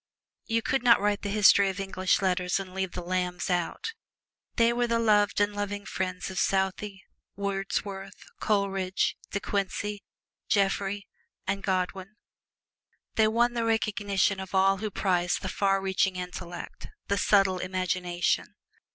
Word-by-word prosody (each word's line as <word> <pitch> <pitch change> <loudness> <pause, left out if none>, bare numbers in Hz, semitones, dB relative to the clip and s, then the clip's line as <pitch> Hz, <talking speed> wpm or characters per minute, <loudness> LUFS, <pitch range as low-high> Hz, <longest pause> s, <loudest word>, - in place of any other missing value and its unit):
You 230 -1 +1
can 270 - +1
not 240 -1 +6
write 205 0 +1
the 200 - -3
history 200 -1 +5
of 190 +1 -5
English 190 0 0
Letters 180 0 +1
and 185 -1 -7
leave 190 -1 -2
the 180 - -5
Lambs 180 -1 -1
out. 180 - -2 0.6
They 235 0 +4
were 240 0 +1
the 230 0 +1
loved 210 -3 +3
and 205 0 +2
loving 205 0 -3
friends 185 0 -3
of 185 - -3
Southey, 190 +1 -1 0.3
Wordsworth, 195 0 -4
Coleridge, 195 - 0
De 200 - -2
Quincey, 205 +1 -2 0.5
Jeffrey 200 0 +1 0.4
and 195 - -1
Godwin. 190 +1 -2 1.0
They 220 -1 +4
won 240 +2 +2
the 235 -1 -1
recognition 205 -3 +1
of 190 0 -6
all 195 +1 +4
who 215 +2 -3
prize 180 -2 +1
the 190 - -4
far 195 0 +1
reaching 190 0 +1
intellect 180 -1 -7 0.2
the 200 -1 +1
subtle 195 -2 +3
imagination. 185 -1 -1
195 Hz, 145 wpm, -28 LUFS, 185-205 Hz, 1.0 s, not